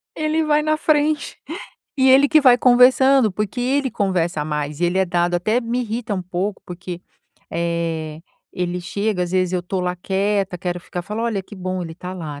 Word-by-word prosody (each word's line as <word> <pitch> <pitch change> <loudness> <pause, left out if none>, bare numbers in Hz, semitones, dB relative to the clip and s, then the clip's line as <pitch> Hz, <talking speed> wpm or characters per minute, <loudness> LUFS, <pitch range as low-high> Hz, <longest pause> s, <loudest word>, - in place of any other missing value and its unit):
ele 310 +1 0
vai 300 0 +3
na 310 0 +1
frente 305 -1 +1 0.6
e 265 -1 +4
ele 275 +2 +6
que 310 +1 +5
vai 250 -3 +6
conversando, 255 -1 +5
porque 210 +5 -3
ele 265 +2 0
conversa 175 -6 0
mais 150 0 -3
e - - +2
ele 175 +2 +1
é 190 - +3
dado, 175 0 0
até 215 +8 +1
me 240 +1 -2
irrita 230 -1 -4
um 185 - -3
pouco, 185 +3 -3
porque, 175 0 -7 0.5
eh, 165 -2 -2 0.3
ele 180 0 -3
chega, 200 +1 -2
às 175 - -7
vezes 185 -1 +1
eu 180 -1 -1
tô 185 +1 -3
lá 180 0 -1
quieta, 195 0 -1
quero 180 0 -3
ficar 175 0 -6
falo: 210 +5 -4
"Olha, 215 -5 -1
que 205 - -13
bom, 185 0 -3
ele 165 -1 -7
tá 180 +2 -7
lá, 155 -5 -7
190 Hz, 200 wpm, -21 LUFS, 175-245 Hz, 0.6 s, ele